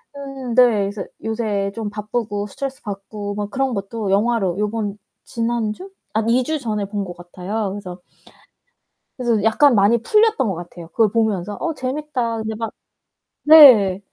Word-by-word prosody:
음 275 Hz, -3 st, -6 dB
네. 250 Hz, -, +8 dB, 0.3 s
그래서 200 Hz, -1 st, -5 dB, 0.2 s
요새 215 Hz, -3 st, -2 dB
좀 220 Hz, -2 st, -4 dB
바쁘고 210 Hz, 0 st, -3 dB
스트레스 270 Hz, +6 st, -6 dB
받고 205 Hz, 0 st, -6 dB
막 205 Hz, 0 st, -4 dB
그런 270 Hz, +1 st, -1 dB
것도 200 Hz, 0 st, -3 dB
영화로 200 Hz, -3 st, +1 dB
요번 210 Hz, -1 st, -2 dB, 0.3 s
지난주? 235 Hz, -, -3 dB, 0.3 s
한 -, -, -4 dB
2 250 Hz, +2 st, +3 dB
주 310 Hz, +4 st, -2 dB
전에 215 Hz, -5 st, -2 dB
본 200 Hz, 0 st, -4 dB
것 175 Hz, -1 st, -9 dB
같아요. 185 Hz, +4 st, -4 dB
그래서 190 Hz, -3 st, -8 dB, 1.2 s
그래서 235 Hz, -5 st, 0 dB
약간 250 Hz, +5 st, +4 dB
많이 205 Hz, +3 st, +4 dB
풀렸던 435 Hz, -, +3 dB
것 195 Hz, -, -1 dB
같아요. 175 Hz, 0 st, -10 dB
그걸 220 Hz, +4 st, +2 dB
보면서 210 Hz, -3 st, -1 dB
'어 335 Hz, -, -1 dB
재밌다.' 260 Hz, -3 st, -3 dB
근데 220 Hz, 0 st, -4 dB
막 225 Hz, 0 st, -4 dB, 0.7 s
네. 255 Hz, -12 st, +8 dB
220 Hz, 295 characters per minute, -20 LUFS, 200-245 Hz, 1.2 s, 네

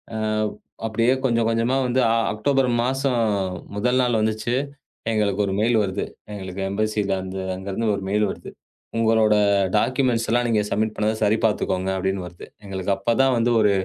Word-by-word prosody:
ஆ. -, -, -2 dB, 0.7 s
அப்படியே 115 Hz, +3 st, +2 dB
கொஞ்சம் 115 Hz, -3 st, +2 dB
கொஞ்சமா 115 Hz, +3 st, +1 dB
வந்து 125 Hz, +1 st, +1 dB
அ -, -, +2 dB, 0.2 s
அக்டோபர் 135 Hz, +4 st, +1 dB, 0.2 s
மாசம் 135 Hz, +1 st, 0 dB, 0.6 s
முதல் 125 Hz, +5 st, +1 dB
நாள் 120 Hz, -2 st, +2 dB
வந்துச்சு. 110 Hz, +2 st, -1 dB, 0.6 s
எங்களுக்கு 105 Hz, -2 st, +1 dB
ஒரு 95 Hz, -, -2 dB
மெயில் 115 Hz, +2 st, +2 dB
வருது. 100 Hz, 0 st, -2 dB, 0.3 s
எங்களுக்கு 95 Hz, -1 st, -6 dB
எம்பஸில 105 Hz, -1 st, 0 dB
இருந்து, 95 Hz, 0 st, -5 dB
அங்க 95 Hz, +1 st, -9 dB
இருந்து 115 Hz, +3 st, -1 dB
ஒரு 100 Hz, -, -5 dB
மெயில் 105 Hz, +2 st, +2 dB
வருது. -, -, -7 dB, 0.5 s
உங்களோட 110 Hz, -1 st, +3 dB, 0.4 s
டாக்குமெண்ட்ஸ் 120 Hz, +1 st, +1 dB
எல்லாம் 120 Hz, +1 st, +2 dB
நீங்க 110 Hz, -3 st, +2 dB
சப்மிட் 110 Hz, +1 st, 0 dB
பண்ணத 110 Hz, +1 st, 0 dB
சரி 105 Hz, +2 st, +3 dB
பார்த்துக்கோங்க 95 Hz, -3 st, 0 dB
அப்படின்னு 95 Hz, 0 st, -1 dB
வருது. 90 Hz, 0 st, -10 dB, 0.2 s
எங்களுக்கு 95 Hz, -1 st, -3 dB
அப்பதான் 120 Hz, +6 st, +2 dB
வந்து 115 Hz, +1 st, +2 dB
ஒரு 105 Hz, -2 st, +4 dB
110 Hz, 160 wpm, -23 LUFS, 100-120 Hz, 0.7 s, ஒரு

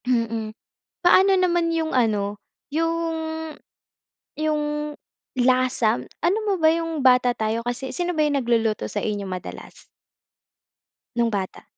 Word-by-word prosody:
Mm. 230 Hz, -3 st, 0 dB, 0.6 s
Paano 380 Hz, +2 st, +6 dB
naman 345 Hz, -2 st, +2 dB
yung 320 Hz, -1 st, -1 dB
ano, 210 Hz, -4 st, +1 dB, 0.4 s
yung 330 Hz, +1 st, 0 dB, 1.2 s
yung 305 Hz, -1 st, 0 dB, 0.7 s
lasa? 255 Hz, -, +2 dB, 0.2 s
Alam 390 Hz, +6 st, +2 dB
mo 400 Hz, -, +2 dB
ba 315 Hz, -, +6 dB
yung 330 Hz, -2 st, -2 dB
bata 250 Hz, -1 st, +5 dB
tayo, 220 Hz, +1 st, -1 dB
kasi 245 Hz, +2 st, -3 dB
sino 355 Hz, 0 st, -1 dB
ba 305 Hz, -, +4 dB
yung 290 Hz, -1 st, +1 dB
nagluluto 225 Hz, -, +1 dB
sa -, -, -3 dB
inyo 205 Hz, -2 st, -2 dB
madalas? 185 Hz, -1 st, -8 dB, 1.3 s
Nung 235 Hz, -1 st, +2 dB
bata? 195 Hz, -3 st, -4 dB
255 Hz, 120 wpm, -23 LUFS, 225-330 Hz, 1.3 s, Paano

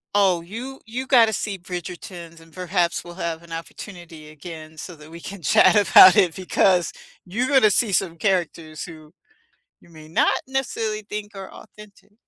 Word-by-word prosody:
Oh, 190 Hz, -4 st, +3 dB
you 235 Hz, +10 st, -8 dB
you 250 Hz, +4 st, -5 dB
gotta 230 Hz, -5 st, +5 dB
see 200 Hz, -1 st, -3 dB
Bridgertons, 175 Hz, -1 st, -8 dB
and 165 Hz, 0 st, -19 dB
perhaps 180 Hz, -1 st, -1 dB
we'll 175 Hz, 0 st, -11 dB
have 165 Hz, -3 st, -4 dB
an 170 Hz, -1 st, -17 dB
opportunity 165 Hz, -2 st, -9 dB
again 155 Hz, 0 st, -11 dB
so 175 Hz, +2 st, -8 dB
that 150 Hz, +1 st, -15 dB
we 170 Hz, -, -10 dB
can 195 Hz, +2 st, -9 dB
chat 155 Hz, -, +5 dB
about 190 Hz, -3 st, +8 dB
it, 180 Hz, -6 st, +3 dB
because 185 Hz, -2 st, +1 dB, 0.3 s
you're 230 Hz, +8 st, -2 dB
gonna 260 Hz, -7 st, +4 dB
see 210 Hz, +2 st, +1 dB
some 175 Hz, -3 st, 0 dB
characters 165 Hz, -4 st, -2 dB
who 155 Hz, -3 st, -12 dB, 0.7 s
you -, -, -21 dB
may 155 Hz, -2 st, -14 dB
not 160 Hz, -, +2 dB
necessarily 230 Hz, -5 st, -2 dB
think 205 Hz, 0 st, -7 dB
are 195 Hz, -1 st, -8 dB
authentic. 210 Hz, -1 st, -16 dB
180 Hz, 165 wpm, -22 LUFS, 165-205 Hz, 0.7 s, about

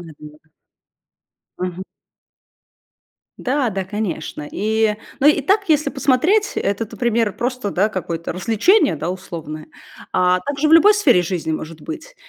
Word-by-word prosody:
наверно. 155 Hz, -1 st, -14 dB, 1.1 s
Мгм. 180 Hz, 0 st, -4 dB, 1.6 s
Да, 260 Hz, -1 st, 0 dB
да, 195 Hz, -1 st, -3 dB
конечно. 185 Hz, -7 st, -4 dB
И, 220 Hz, +1 st, +1 dB, 0.2 s
ну, 275 Hz, -, +4 dB
и 295 Hz, 0 st, +5 dB
так, 395 Hz, +4 st, +1 dB
если 300 Hz, -2 st, +3 dB
посмотреть, 310 Hz, +11 st, +2 dB
этот 200 Hz, +2 st, -2 dB
пример 230 Hz, -4 st, +1 dB
просто, 250 Hz, -3 st, -3 dB
да, 195 Hz, +3 st, +1 dB
какое-то 170 Hz, -4 st, -4 dB
развлечение, 225 Hz, -, +2 dB
да, 160 Hz, +3 st, -4 dB
условное. 160 Hz, -4 st, -7 dB, 0.4 s
А 180 Hz, 0 st, +3 dB
так 280 Hz, +9 st, -4 dB
же 305 Hz, +2 st, +2 dB
в -, -, +2 dB
любой 360 Hz, +6 st, +8 dB
сфере 265 Hz, -, +4 dB
жизни 175 Hz, -2 st, -3 dB
может 155 Hz, +1 st, -5 dB
быть. 325 Hz, +9 st, -8 dB
215 Hz, 135 wpm, -20 LUFS, 175-285 Hz, 1.6 s, любой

